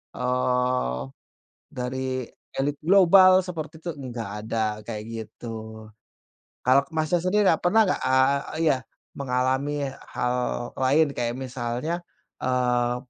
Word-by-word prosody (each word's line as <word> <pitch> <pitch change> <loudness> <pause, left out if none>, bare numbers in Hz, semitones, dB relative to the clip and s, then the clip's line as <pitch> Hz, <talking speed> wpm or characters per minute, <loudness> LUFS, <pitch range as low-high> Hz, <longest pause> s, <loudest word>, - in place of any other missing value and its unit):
eee, 125 - 0 0.7
dari 130 +1 -3 0.5
elit 140 +2 0
global, 185 +1 +7
seperti 160 -3 -6
itu, 175 - -2
nggak 120 -6 -6 0.2
ada, 115 - -1 0.3
kayak 105 -2 -4
gitu. 110 -1 -8 0.8
Kalau 130 +2 +5
Masnya 155 +2 +1
sendiri 200 +3 +2
a 160 - +2
pernah 215 +6 +4
nggak, 185 - +1
eee 130 +2 +3 0.3
iya, 135 - +3 0.4
mengalami 135 +2 0 0.2
hal 125 0 -1
lain 140 +4 +3
kayak 120 -1 -1
misalnya, 130 +6 -3 0.4
eee, 125 -1 +1
130 Hz, 110 wpm, -25 LUFS, 125-155 Hz, 0.8 s, global